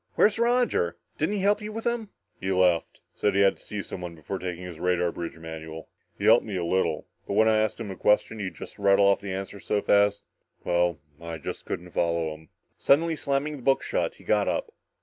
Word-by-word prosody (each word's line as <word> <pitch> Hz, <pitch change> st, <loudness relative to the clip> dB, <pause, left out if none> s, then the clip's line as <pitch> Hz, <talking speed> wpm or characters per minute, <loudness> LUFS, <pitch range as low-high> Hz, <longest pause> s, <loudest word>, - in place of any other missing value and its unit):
"Where's 210 Hz, +1 st, +4 dB
Roger? 250 Hz, -, +2 dB, 0.2 s
Didn't 210 Hz, -, +1 dB
he 200 Hz, -, -1 dB
help 205 Hz, +2 st, +3 dB
you 210 Hz, 0 st, -5 dB
with 225 Hz, +1 st, -5 dB
them?" 235 Hz, -3 st, -1 dB, 0.3 s
"He 95 Hz, -, -2 dB
left. 90 Hz, -3 st, +2 dB
Said 100 Hz, -2 st, 0 dB
he 100 Hz, -, +4 dB
had 100 Hz, -1 st, +4 dB
to -, -, -14 dB
see 105 Hz, -2 st, -5 dB
someone 90 Hz, -2 st, -7 dB
before 85 Hz, +5 st, -5 dB
taking 90 Hz, -1 st, -5 dB
his 90 Hz, -3 st, -8 dB
radar 90 Hz, -1 st, +1 dB
bridge 85 Hz, -1 st, -6 dB
manual. 80 Hz, 0 st, -8 dB, 0.3 s
He 100 Hz, -, -3 dB
helped 115 Hz, +2 st, +7 dB
me 105 Hz, -3 st, -5 dB
a 90 Hz, -2 st, -1 dB
little. 95 Hz, +2 st, 0 dB, 0.2 s
But -, -, -2 dB
when 110 Hz, +1 st, +5 dB
I'd 110 Hz, -1 st, +4 dB
ask 110 Hz, +1 st, -1 dB
him 110 Hz, -4 st, -5 dB
a -, -, -6 dB
question, 105 Hz, +3 st, +2 dB
he'd 95 Hz, -4 st, -4 dB
just -, -, -10 dB
rattle 100 Hz, 0 st, +5 dB
the 100 Hz, -, -8 dB
answer 95 Hz, +2 st, -5 dB
off -, -, -14 dB
so 105 Hz, -, +1 dB
fast 100 Hz, 0 st, +3 dB, 0.4 s
well, 85 Hz, -2 st, +1 dB, 0.2 s
I 85 Hz, -1 st, -5 dB
just -, -, -6 dB
couldn't 90 Hz, +1 st, -5 dB
follow 85 Hz, -2 st, 0 dB
him." 80 Hz, 0 st, -15 dB, 0.3 s
Suddenly 160 Hz, +4 st, +3 dB
slamming 145 Hz, +1 st, -1 dB
the -, -, -11 dB
book 135 Hz, +2 st, +2 dB
shut, -, -, -1 dB
he -, -, -18 dB
got -, -, +2 dB
up. -, -, -1 dB
100 Hz, 225 wpm, -27 LUFS, 85-135 Hz, 0.4 s, helped